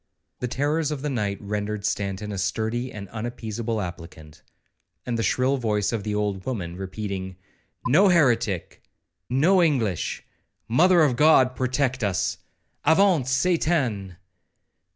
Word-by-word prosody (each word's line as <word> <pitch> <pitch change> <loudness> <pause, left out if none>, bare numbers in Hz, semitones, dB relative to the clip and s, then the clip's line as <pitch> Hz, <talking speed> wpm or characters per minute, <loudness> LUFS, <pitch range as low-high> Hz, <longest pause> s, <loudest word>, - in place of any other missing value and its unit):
The 125 - -2
terrors 145 +5 0
of 145 -2 -4
the 150 - -1
night 105 -5 -1
rendered 105 0 -3
Stanton 100 0 -2
a 100 - -4
sturdy 115 +6 -2
and 100 -4 -8
unappeasable 115 0 -4
applicant; 85 -4 -8 0.6
and 120 - -2
the 115 - -1
shrill 130 +4 +1
voice 105 -3 0
of 115 - -1
the 105 +1 -3
old 100 -2 -1
woman, 95 -9 -4
repeating, 95 0 -5 0.5
'no 155 +11 +5
heretic—no 120 - +1
English—Mother 145 - +1
of 135 -5 +2
God 130 -3 +5
protect 130 -1 0
us—avaunt 145 - 0
Satan!' 130 - 0
115 Hz, 115 wpm, -24 LUFS, 100-135 Hz, 0.6 s, no